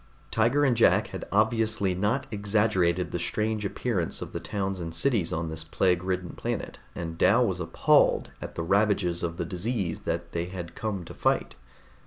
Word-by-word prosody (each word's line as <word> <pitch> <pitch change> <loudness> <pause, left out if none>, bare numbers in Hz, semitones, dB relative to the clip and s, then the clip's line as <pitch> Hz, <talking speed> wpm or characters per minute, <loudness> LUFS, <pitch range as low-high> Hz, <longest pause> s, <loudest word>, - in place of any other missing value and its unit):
Tiger 120 +6 +3
and 130 -3 +3
Jack 115 - +4
had - - -6
obviously 110 -2 +2
not 105 +9 0
exaggerated 100 -4 +1
the - - -2
strange 110 0 -1
appearance 100 -3 -2
of - - -7
the - - -3
towns 95 -2 -3
and 80 -1 -5
cities 105 -3 +2
on 80 0 -2
this 80 0 -5
plague 90 +2 +1
ridden 90 -1 -2
planet, - - -4 0.2
and 80 -1 -5
Dal 120 +5 +5
was 95 -5 -1
appalled 80 -1 +3
at - - -7
the 85 - -2
ravages 100 -2 +2
of 85 -1 -3
the 85 - -2
disease 95 0 -2
that - - -3
they 85 0 -2
had 90 -2 -7
come 100 -5 -3
to - - -9
fight. - - 0
95 Hz, 180 wpm, -27 LUFS, 85-110 Hz, 0.2 s, Dal